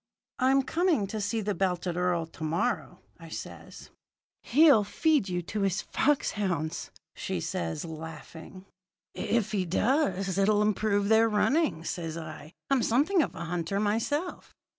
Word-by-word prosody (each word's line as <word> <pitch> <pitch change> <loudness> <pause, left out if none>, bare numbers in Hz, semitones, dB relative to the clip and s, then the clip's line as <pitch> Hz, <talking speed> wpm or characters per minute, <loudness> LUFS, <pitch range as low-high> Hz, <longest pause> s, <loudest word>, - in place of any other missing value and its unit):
"'I'm 265 +1 +4
coming 320 - +1
to 215 +2 -4
see 220 +2 -1
the 205 0 -1
belted 180 -1 -1
earl 180 -2 0
to 160 0 -11
morrow,' 170 +11 -1 0.2
I - - -11
says. - - -9 0.5
"'He'll 280 -4 +5
feed 290 - +1
you 175 -1 -2
to 205 +5 -4
his 195 0 0
fox 295 0 +1
hounds,' 175 -6 -2 0.3
says 80 -1 -3
she, - - -6
laughing. 160 +3 -9 0.5
"'If 225 -3 -1
he 200 -3 0
does, 195 - +1
it'll 205 +1 +3
improve 205 -1 +1
their 225 +1 +5
running,' 260 - +1
says 165 -1 -4
I. 155 -2 -8 0.2
'I'm 270 -2 +4
something 300 - +3
of - - -2
a - - -5
hunter 175 +3 -2
myself.' 230 - -2
200 Hz, 145 wpm, -28 LUFS, 175-240 Hz, 0.5 s, He'll